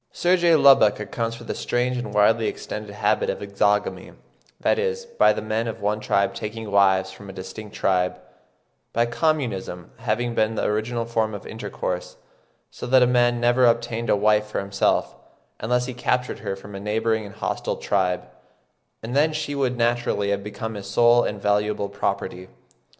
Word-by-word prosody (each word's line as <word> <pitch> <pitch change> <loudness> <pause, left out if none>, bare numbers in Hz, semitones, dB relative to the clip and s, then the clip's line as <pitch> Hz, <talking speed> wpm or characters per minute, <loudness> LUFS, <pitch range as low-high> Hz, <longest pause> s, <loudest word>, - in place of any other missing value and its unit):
Sir 180 +1 +2
J. 170 -2 +4
Lubbock 135 -9 +6
accounts 115 +2 -3
for 115 - -11
the - - -4
strange 125 +1 -1
and 120 -4 -4
widely 110 +2 +3
extended 105 0 -5
habit 105 - 0
of - - -1
exogamy—that 100 +1 -2
is, 470 0 -2
the - - +4
men 110 +2 -1
of 115 0 -5
one 105 +1 0
tribe 100 -2 +1
taking 110 +1 -6
wives 95 -1 +3
from 100 +1 -12
a - - -8
distinct 105 +3 -9
tribe,—by 95 +4 -3
communism 120 - -2
having 120 +1 -1
been 110 0 +1
the - - -1
original 115 +2 -1
form 110 -2 -1
of 100 - -9
intercourse; 100 -4 -5 0.5
so - - -7
that 130 0 +5
a - - +6
man 120 -1 +3
never 120 +1 +4
obtained 115 -1 0
a - - +5
wife 105 +1 +2
for 105 - -3
himself 100 0 0 0.4
unless 125 +3 0
he 130 - -5
captured 125 0 -1
her 100 -2 -3
from 100 +1 -12
a 100 - -6
neighbouring 110 +2 0
and 100 -1 -10
hostile - - -2
tribe, 90 -3 0 0.8
and 120 +3 -4
then 150 +3 +4
she 155 -1 -3
would 130 -3 0
naturally 120 -4 +1
have 100 0 -1
become 105 +2 -5
his 100 -2 -7
sole 120 0 +5
and 105 - -3
valuable 105 0 +1
property. 95 -2 -3
110 Hz, 170 wpm, -23 LUFS, 100-120 Hz, 0.8 s, Lubbock